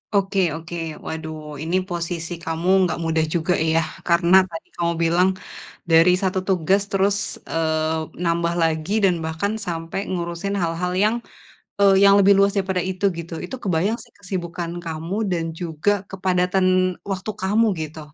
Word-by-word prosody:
Oke 195 Hz, 0 st, +1 dB, 0.2 s
oke 170 Hz, +1 st, -8 dB, 0.3 s
waduh 160 Hz, -1 st, -5 dB, 0.2 s
ini 165 Hz, +3 st, -1 dB
posisi 170 Hz, -1 st, -4 dB
kamu 165 Hz, +2 st, -3 dB, 0.2 s
nggak -, -, -2 dB
mudah 160 Hz, -1 st, +1 dB
juga 170 Hz, +1 st, +1 dB, 0.2 s
ya 165 Hz, -, +3 dB, 0.3 s
karena 170 Hz, +1 st, +4 dB
tadi 165 Hz, -1 st, -8 dB
kamu 170 Hz, -1 st, 0 dB
bilang, 175 Hz, +3 st, +3 dB, 0.6 s
dari 165 Hz, +2 st, +6 dB
1 190 Hz, 0 st, 0 dB
tugas 190 Hz, +2 st, +2 dB
terus, 195 Hz, +1 st, +2 dB, 0.3 s
eee, 160 Hz, 0 st, 0 dB, 0.2 s
nambah 170 Hz, 0 st, +1 dB
lagi 160 Hz, +3 st, 0 dB
dan 185 Hz, -, +4 dB
bahkan 160 Hz, +6 st, -2 dB
sampai 165 Hz, +1 st, -3 dB
ngurusin 170 Hz, +2 st, -3 dB
hal-hal 170 Hz, +2 st, -1 dB
yang, 215 Hz, -, +3 dB, 0.7 s
eee, 195 Hz, -1 st, +6 dB
yang 200 Hz, -, +7 dB
lebih 200 Hz, +1 st, +6 dB
luas 200 Hz, 0 st, +4 dB
daripada 190 Hz, -2 st, 0 dB
itu 190 Hz, +1 st, -2 dB
gitu, 170 Hz, 0 st, -6 dB
itu -, -, -6 dB
kebayang 195 Hz, +4 st, +1 dB
sih 230 Hz, -, -15 dB
kesibukan 175 Hz, -3 st, -5 dB
kamu 165 Hz, +3 st, -4 dB, 0.2 s
dan 170 Hz, -2 st, 0 dB, 0.2 s
juga 180 Hz, +4 st, 0 dB
kepadatan 185 Hz, -1 st, 0 dB, 0.5 s
waktu 195 Hz, +3 st, -3 dB
kamu 210 Hz, +4 st, +3 dB, 0.2 s
gitu, 155 Hz, +1 st, -6 dB
175 Hz, 150 wpm, -22 LUFS, 165-190 Hz, 0.7 s, yang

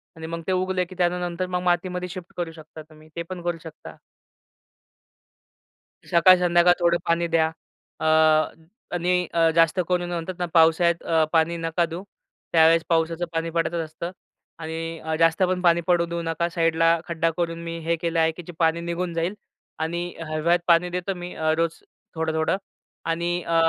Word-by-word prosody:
आणि 160 Hz, 0 st, -7 dB
मग 165 Hz, 0 st, -5 dB
ते -, -, +1 dB
उगलं 185 Hz, 0 st, 0 dB
की 185 Hz, -, -10 dB
त्यानंतर 175 Hz, 0 st, 0 dB
मग 180 Hz, 0 st, -2 dB
मातीमध्ये 180 Hz, 0 st, 0 dB
शिफ्ट 180 Hz, 0 st, -9 dB
करू 170 Hz, -2 st, -3 dB
शकता 160 Hz, 0 st, -12 dB
तुम्ही. 155 Hz, 0 st, -18 dB
ते 170 Hz, -, -3 dB
पण 185 Hz, -1 st, -6 dB
करू 175 Hz, -1 st, -1 dB
शकता. 160 Hz, -2 st, -11 dB, 2.1 s
सकाळ 175 Hz, +2 st, +7 dB
संध्याकाळ 175 Hz, 0 st, +5 dB
थोडं 170 Hz, 0 st, +3 dB
पाणी 170 Hz, 0 st, +1 dB
द्या. 165 Hz, -1 st, +2 dB, 0.5 s
अ, -, -, -3 dB, 0.9 s
आणि 180 Hz, 0 st, +1 dB
अ, 165 Hz, -1 st, +4 dB
जास्त 165 Hz, +2 st, +4 dB
करून 175 Hz, -1 st, 0 dB
म्हणतात 175 Hz, +2 st, -3 dB
ना 175 Hz, -, 0 dB
पावसाळ्यात 165 Hz, -1 st, +3 dB
पाणी 165 Hz, +1 st, +2 dB
नका 165 Hz, +1 st, 0 dB
देऊ. 170 Hz, +3 st, -7 dB, 0.5 s
त्यावेळेस 165 Hz, 0 st, +5 dB
पावसाचं 165 Hz, +1 st, +1 dB
पाणी 165 Hz, 0 st, -1 dB
पडतच 165 Hz, +1 st, -1 dB
असतं 160 Hz, +2 st, -6 dB, 0.5 s
आणि 165 Hz, 0 st, -5 dB, 0.2 s
जास्त 165 Hz, +3 st, +3 dB
पण 180 Hz, 0 st, +1 dB
पाणी 170 Hz, -1 st, +4 dB
पडू 175 Hz, -1 st, +3 dB
देऊ 170 Hz, 0 st, -4 dB
नका 165 Hz, +1 st, -1 dB
साईडला 165 Hz, 0 st, +2 dB
खड्डा 165 Hz, -1 st, 0 dB
करून 165 Hz, -1 st, -2 dB
मी 170 Hz, 0 st, -5 dB
हे 170 Hz, 0 st, +2 dB
केलं 165 Hz, 0 st, -1 dB
आहे 160 Hz, 0 st, +3 dB
की 175 Hz, +2 st, -10 dB
जे 175 Hz, -, -8 dB
पाणी 165 Hz, 0 st, +2 dB
निघून 170 Hz, +1 st, -3 dB
जाईल 170 Hz, +4 st, -1 dB, 0.5 s
आणि 170 Hz, +2 st, -2 dB, 0.2 s
हिवाळ्यात 165 Hz, +3 st, +2 dB
पाणी 170 Hz, +1 st, +4 dB
देतो 180 Hz, +2 st, -3 dB
मी 175 Hz, 0 st, -7 dB, 0.2 s
रोज 165 Hz, 0 st, -1 dB, 0.3 s
थोडं-थोडं. 160 Hz, +2 st, 0 dB, 0.5 s
आणि 170 Hz, +1 st, -1 dB
अ, 165 Hz, -, -1 dB
170 Hz, 165 wpm, -24 LUFS, 165-175 Hz, 2.1 s, सकाळ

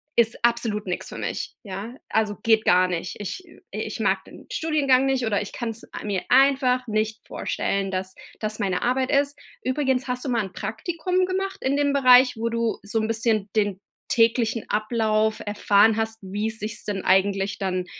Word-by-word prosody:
ist 230 Hz, -1 st, +3 dB
absolut 230 Hz, -3 st, 0 dB
nix 180 Hz, -, -3 dB
für -, -, -8 dB
mich. -, -, -4 dB
Ja, 205 Hz, +4 st, -6 dB
also, 215 Hz, -2 st, +1 dB
geht 220 Hz, -1 st, +4 dB
gar 180 Hz, +1 st, +5 dB
nicht. 175 Hz, -1 st, -4 dB
Ich 210 Hz, -, -5 dB
I 325 Hz, -, -17 dB
ich -, -, -4 dB
mag -, -, +1 dB
den -, -, -14 dB
Studiengang 275 Hz, -5 st, +2 dB
nicht, 265 Hz, -2 st, +1 dB
oder 215 Hz, -1 st, +1 dB
ich 205 Hz, -, -6 dB
kann's 230 Hz, -2 st, -5 dB, 0.2 s
mir 200 Hz, -3 st, -1 dB
einfach 265 Hz, -2 st, +4 dB
nicht 220 Hz, +1 st, -2 dB
vorstellen, 195 Hz, -1 st, -2 dB
dass 185 Hz, 0 st, -3 dB, 0.3 s
das 215 Hz, 0 st, -3 dB
meine 190 Hz, -3 st, -1 dB
Arbeit 255 Hz, +1 st, +1 dB
ist.” 285 Hz, 0 st, +2 dB, 0.3 s
Übrigens, 265 Hz, -1 st, 0 dB
hast 250 Hz, 0 st, -2 dB
du 270 Hz, -, -2 dB
mal 230 Hz, -3 st, +1 dB
'n 190 Hz, -, -11 dB
Praktikum 335 Hz, -, -1 dB
gemacht 385 Hz, +1 st, -2 dB
in 265 Hz, +1 st, +1 dB
dem 285 Hz, -1 st, +2 dB
Bereich, 255 Hz, -2 st, +6 dB
wo 230 Hz, +1 st, -1 dB
du 230 Hz, -1 st, -1 dB
so 210 Hz, +2 st, -1 dB
'n 220 Hz, -, -1 dB
bisschen 220 Hz, -2 st, 0 dB
den 205 Hz, -2 st, 0 dB, 0.3 s
täglichen 230 Hz, -4 st, +2 dB
Ablauf 215 Hz, 0 st, +1 dB
erfahren 205 Hz, +1 st, +3 dB
hast, 220 Hz, 0 st, -2 dB
wie 205 Hz, +3 st, -3 dB
sich's 215 Hz, -1 st, -4 dB
denn 200 Hz, -2 st, -3 dB
eigentlich 195 Hz, +1 st, +2 dB
dann 185 Hz, -2 st, -2 dB
220 Hz, 180 wpm, -24 LUFS, 205-255 Hz, 0.3 s, Bereich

